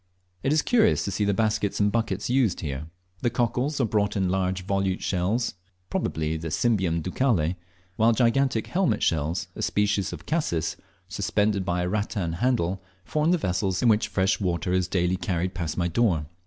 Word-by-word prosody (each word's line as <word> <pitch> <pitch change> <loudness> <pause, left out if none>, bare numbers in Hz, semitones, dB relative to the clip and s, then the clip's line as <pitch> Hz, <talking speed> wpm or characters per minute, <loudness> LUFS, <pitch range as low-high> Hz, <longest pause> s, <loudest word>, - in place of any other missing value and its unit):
It 135 - 0
is 155 0 +3
curious 220 -3 +3
to 100 - -2
see 105 - 0
the 100 - +2
baskets 105 -2 0
and 105 0 +3
buckets 110 -3 -1
used 125 -7 +1
here. 70 -1 -4 0.3
The 120 - +2
cockles 125 +5 0
are 130 - +3
brought 105 -1 0
in 95 -2 +1
large 95 -1 -1
volute 95 -1 0
shells, 100 +7 0 0.4
probably 80 0 -1
the 80 +1 -5
Cymbium 90 -3 +1
ducale, 95 - +1 0.4
while 115 +1 +5
gigantic 120 0 +2
helmet 185 0 0
shells, 80 +3 0
a - - -6
species 100 -2 +1
of - - -8
Cassis, 85 - -1 0.3
suspended 105 -1 0
by 90 -1 -1
a - - -1
rattan 100 -3 -2
handle, 95 -3 0 0.2
form 155 - +1
the 180 - +4
vessels 95 - -1
in 120 - +5
which 105 0 +3
fresh 95 +1 +1
water 90 -1 -1
is 90 -1 +1
daily 90 0 +1
carried 90 -1 -2
past 85 -3 -3
my 85 -1 +1
door. 85 -4 +1
95 Hz, 180 wpm, -26 LUFS, 90-115 Hz, 0.4 s, while